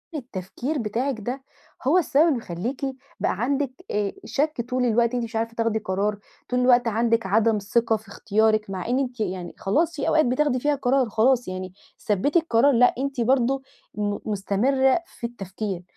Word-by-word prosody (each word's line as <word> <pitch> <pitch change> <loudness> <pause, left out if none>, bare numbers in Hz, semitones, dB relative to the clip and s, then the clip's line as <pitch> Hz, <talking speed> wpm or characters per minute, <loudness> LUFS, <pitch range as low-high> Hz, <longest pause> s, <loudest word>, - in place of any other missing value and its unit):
التفكير 245 - -4
بتاعِك 235 +2 -2
ده 250 +6 -5 0.4
هو 315 +7 +5
السبب 305 -4 +4
اللي 285 -7 +1
بيخلّيكِ 225 - -5 0.4
بقى - - +1
عندِك 275 +1 0 0.2
آآ، 205 -1 -1
شك 300 -2 -1
طول 255 0 +1
الوقت 235 +1 +2
أنتِ 245 - -1
مش 230 0 -7
عارفة 230 +1 -1
تاخدي 230 -1 0
قرار، 205 +1 -1 0.3
طول 250 - +1
الوقت 250 -1 +4
عندِك 230 0 +1
عدم 220 +3 +3
ثقة 225 +3 +1
في 215 0 -19
اختيارِك، 215 +1 +1
مع 190 0 -4
إن 250 +2 +1
أنتِ 250 -3 -3
يعني 185 -4 -3
خلاص 315 - +1
في 290 - -2
أوقات 310 0 +4
بتاخدي 255 +1 +1
فيها 290 +3 +1
قرار 260 -2 +1
خلاص، 240 +3 +2
يعني 185 0 -5 0.3
ثبتي 225 - +2
القرار، 285 -4 +3
لأ، 245 +1 +5
أنتِ 270 -1 -2
برضه 260 +2 +2 0.3
م 205 -1 -1
مستمرّة 240 - +2
في 235 - -6
التفكير. 195 -4 -5
235 Hz, 175 wpm, -24 LUFS, 210-265 Hz, 0.4 s, هو